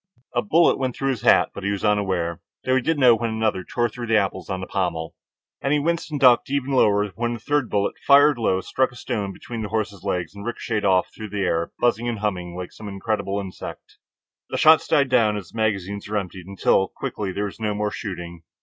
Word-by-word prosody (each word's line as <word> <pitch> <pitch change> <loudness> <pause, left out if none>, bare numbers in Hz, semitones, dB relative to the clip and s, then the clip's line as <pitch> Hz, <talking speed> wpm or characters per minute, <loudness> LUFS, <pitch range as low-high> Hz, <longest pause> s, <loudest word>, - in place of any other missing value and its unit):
A 120 - +2
bullet 165 +11 +3
went 130 -2 -1
through 135 0 0
his 120 -5 -4
hat, - - +4
but 100 - -8
he 100 - 0
was 100 0 -2
unaware, 95 -5 0 0.2
though 130 - +2
he 130 - +3
did 160 +5 0
know 125 -4 +7
when 115 +1 -1
another 110 -4 -1
tore 120 +6 0
through 120 +1 -7
the 110 0 +4
apples 95 -2 -1
on 95 -1 -2
the 95 - -5
pommel. 85 -5 -2 0.5
And 140 - +1
he 150 - +3
winced 170 +3 -1
and 150 -2 -3
ducked 125 -3 +5
even 140 -1 -1
lower 105 -5 +3
when 120 +6 -2
a - - -8
third 145 +1 0
bullet, 100 -1 0
fired 145 -1 +6
low, 95 -4 +1
struck 130 +6 0
a - - -16
stone 100 -4 -3
between 115 +3 -7
his 105 - -4
horse's 105 -2 -2
legs 90 -4 -2
and 100 0 -9
ricochetted 115 -2 -3
off 95 -2 +2
through 110 -1 -8
the 100 0 -3
air, 85 -2 0
buzzing 120 0 +1
and 115 - -2
humming 90 -4 -3
like 90 0 -6
some 110 - -10
incredible 100 0 -2
insect. 95 -2 -9 0.5
The - - -2
shots 155 0 +6
died 140 -2 +3
down 110 -5 +3
as 95 -5 -8
the - - -12
magazines 100 -2 -1
were 105 - 0
emptied, 95 -2 -5
until, 95 0 +2
quickly, 100 +1 -4
there 100 +3 -2
was 100 - -7
no 105 -2 -1
more 105 0 -1
shooting. 85 -5 -6
105 Hz, 230 wpm, -23 LUFS, 95-120 Hz, 0.5 s, know